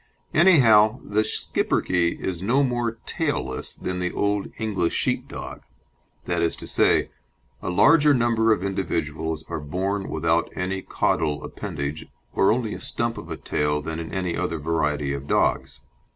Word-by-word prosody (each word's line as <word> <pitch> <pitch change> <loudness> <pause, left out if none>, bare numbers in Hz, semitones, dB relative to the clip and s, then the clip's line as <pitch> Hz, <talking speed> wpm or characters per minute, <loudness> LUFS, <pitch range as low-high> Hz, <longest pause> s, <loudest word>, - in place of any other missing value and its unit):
Anyhow 125 - +6
the 105 +1 +1
Schipperke 90 -5 0
is 90 -2 -3
no 125 +8 +2
more 120 -3 -1
"tailless" - - -3
than 90 0 -4
the 90 0 -1
old 100 0 0
English 100 -6 -1
Sheepdog. - - -3 0.6
That - - 0
is 85 - +1
to - - -9
say - - +2 0.5
a - - -3
larger 150 - +5
number 115 -3 +3
of 100 -4 +2
individuals 80 -5 -2
are - - -4
born 95 +6 -2
without - - +1
any 95 +1 -2
caudal 75 -5 0
appendage 70 +2 -5 0.3
or 95 - +4
only 115 -2 0
a - - -6
stump 115 0 -2
of 85 - -10
a 80 - -4
tail 75 0 0
than 80 +2 -5
in 80 - -6
any 90 -2 -2
other 90 -3 -2
variety 75 -2 0
of 70 0 -6
dogs. - - 0
95 Hz, 150 wpm, -24 LUFS, 80-110 Hz, 0.6 s, Anyhow